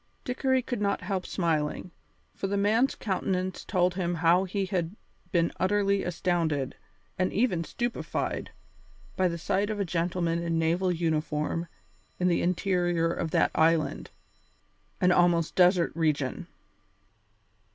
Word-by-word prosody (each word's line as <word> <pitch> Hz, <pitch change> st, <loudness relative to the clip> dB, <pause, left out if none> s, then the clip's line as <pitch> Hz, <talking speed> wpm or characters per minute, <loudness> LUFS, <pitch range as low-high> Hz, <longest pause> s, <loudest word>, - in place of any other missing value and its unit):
Dickory 260 Hz, 0 st, +1 dB
could 245 Hz, -3 st, -4 dB
not 200 Hz, -1 st, 0 dB
help 190 Hz, -3 st, -3 dB
smiling, 165 Hz, 0 st, -1 dB, 0.4 s
for 195 Hz, -, -3 dB
the 200 Hz, +1 st, -1 dB
man's 220 Hz, +7 st, +2 dB
countenance 185 Hz, -2 st, -2 dB
told 180 Hz, -2 st, +1 dB
him 175 Hz, -1 st, -1 dB
how 170 Hz, +3 st, +3 dB
he 195 Hz, +1 st, -2 dB
had 180 Hz, -1 st, -2 dB, 0.4 s
been 170 Hz, -1 st, +2 dB
utterly 200 Hz, +1 st, +2 dB
astounded, 165 Hz, -6 st, -1 dB, 0.5 s
and 185 Hz, -, +1 dB
even 195 Hz, -6 st, +1 dB
stupefied, 240 Hz, +7 st, -3 dB, 0.7 s
by 185 Hz, -, +2 dB
the 170 Hz, -1 st, -3 dB
sight 195 Hz, +5 st, 0 dB
of 215 Hz, -1 st, -3 dB
a 200 Hz, -, 0 dB
gentleman 170 Hz, 0 st, -1 dB
in 165 Hz, -1 st, -1 dB
naval 170 Hz, +3 st, +1 dB
uniform 160 Hz, -1 st, -1 dB, 0.5 s
in 180 Hz, 0 st, +2 dB
the 170 Hz, -, +2 dB
interior 175 Hz, -2 st, +1 dB
of 165 Hz, -, -3 dB
that -, -, +2 dB
island, 160 Hz, -1 st, +1 dB, 0.9 s
an 180 Hz, -, +4 dB
almost 175 Hz, -2 st, +3 dB
desert 180 Hz, -1 st, +4 dB
region. 150 Hz, -5 st, -1 dB
180 Hz, 130 wpm, -28 LUFS, 165-195 Hz, 0.9 s, an